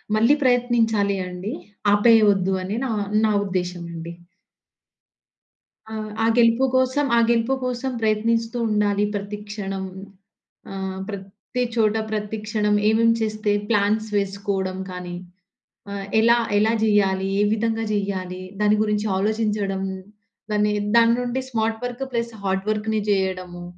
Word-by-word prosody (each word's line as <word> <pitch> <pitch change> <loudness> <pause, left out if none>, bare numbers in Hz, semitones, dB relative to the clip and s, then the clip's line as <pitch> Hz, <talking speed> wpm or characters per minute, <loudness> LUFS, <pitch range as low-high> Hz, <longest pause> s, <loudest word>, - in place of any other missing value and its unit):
మళ్లీ 230 +7 +5
ప్రయత్నించాలి 230 -5 +2
అండి. 180 +5 -5 0.4
ఆపేయవద్దు 205 -3 +4
అని 195 +3 -3
నా 255 - -2 0.3
నా 215 - +2
ఉద్దేశం 180 -2 -3
అండి. 165 0 -7 1.8
ఆహ్, 215 -1 -5
ఆ - - +3
గెలుపు 235 +2 +4
కోసం, 260 +3 +2
ఆ - - +6
గెలుపు 235 +2 +2
కోసం 255 +1 -2
ప్రయత్నిస్తూ 225 +2 +1
ఉండాలి 205 -1 +1
ప్రతి 200 +1 -4
క్షణం. 195 -2 -4 0.9
ఆహ్, 190 -1 -4
ప్రతి 200 +4 -5
చోట, 220 -2 +2 0.2
ప్రతి 210 0 -3
క్షణం 210 -1 +1
ఏమేం 225 +1 +4
చేస్తే 215 -1 0 0.2
ప్లాన్స్ 215 +1 +2
వేసుకోవడం 195 -1 -2
కానీ, 180 -1 -6 0.8
ఆహ్, 200 -1 -4 0.2
ఎలా 235 +1 +5 0.2
ఎలా 220 +2 +3
చేయాలి, 195 -3 +2
ఏ - - +4
విధంగా 225 0 0
చేయాలి, 185 -2 -3 0.2
దాని 210 0 +4
గురించి 210 0 0
ఆలోచించడం, 205 -2 -1 0.7
దాన్ని 210 0 +2 0.2
దాని 230 0 +6
నుండి 245 +2 -2
స్మార్ట్ 220 -2 -1
వర్క్ 245 +2 -3
ప్లస్ 235 -1 -2
హార్డ్ 195 0 -1
వర్క్‌ని 215 0 0
చేయడము 185 -3 -1
210 Hz, 125 wpm, -23 LUFS, 195-225 Hz, 1.8 s, ఆ